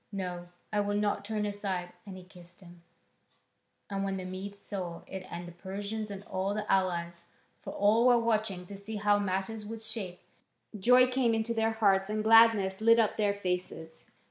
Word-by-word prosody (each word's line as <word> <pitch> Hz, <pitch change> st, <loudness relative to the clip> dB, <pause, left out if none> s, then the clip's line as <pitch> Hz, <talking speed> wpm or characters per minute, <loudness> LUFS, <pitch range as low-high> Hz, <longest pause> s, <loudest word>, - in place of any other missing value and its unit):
"No, 180 Hz, -3 st, -5 dB, 0.3 s
I 210 Hz, -, +2 dB
will 205 Hz, 0 st, 0 dB
not 205 Hz, 0 st, 0 dB
turn 210 Hz, 0 st, -2 dB
aside." 195 Hz, -3 st, -3 dB
And 190 Hz, -1 st, -8 dB
he 185 Hz, -, -11 dB
kissed 180 Hz, 0 st, -15 dB
him. 175 Hz, -1 st, -15 dB, 1.1 s
And 195 Hz, -1 st, -3 dB
when 195 Hz, -1 st, -2 dB
the 185 Hz, -, -6 dB
Medes 190 Hz, +2 st, -6 dB
saw 180 Hz, -5 st, -6 dB
it 190 Hz, -1 st, -8 dB
and 175 Hz, 0 st, -6 dB
the -, -, -9 dB
Persians 200 Hz, +5 st, -5 dB
and 200 Hz, -1 st, -7 dB
all 195 Hz, +1 st, -2 dB
the 210 Hz, 0 st, -3 dB
allies 170 Hz, -2 st, 0 dB, 0.4 s
for -, -, -7 dB
all 220 Hz, +4 st, +4 dB
were 245 Hz, -1 st, +6 dB
watching 215 Hz, -5 st, 0 dB
to 200 Hz, -, -9 dB
see 200 Hz, +3 st, -8 dB
how 205 Hz, 0 st, +2 dB
matters 200 Hz, +2 st, -2 dB
would 225 Hz, +1 st, -7 dB
shape 215 Hz, -5 st, -6 dB, 0.5 s
joy 250 Hz, +5 st, +6 dB
came 250 Hz, -2 st, +1 dB
into 225 Hz, +1 st, -1 dB
their 225 Hz, 0 st, +1 dB
hearts 195 Hz, -3 st, +2 dB
and 215 Hz, 0 st, -1 dB
gladness 220 Hz, -3 st, +5 dB
lit 230 Hz, +1 st, +6 dB
up 225 Hz, -3 st, +2 dB
their 205 Hz, -2 st, +1 dB
faces. 180 Hz, -4 st, -4 dB
200 Hz, 185 wpm, -30 LUFS, 185-220 Hz, 1.1 s, were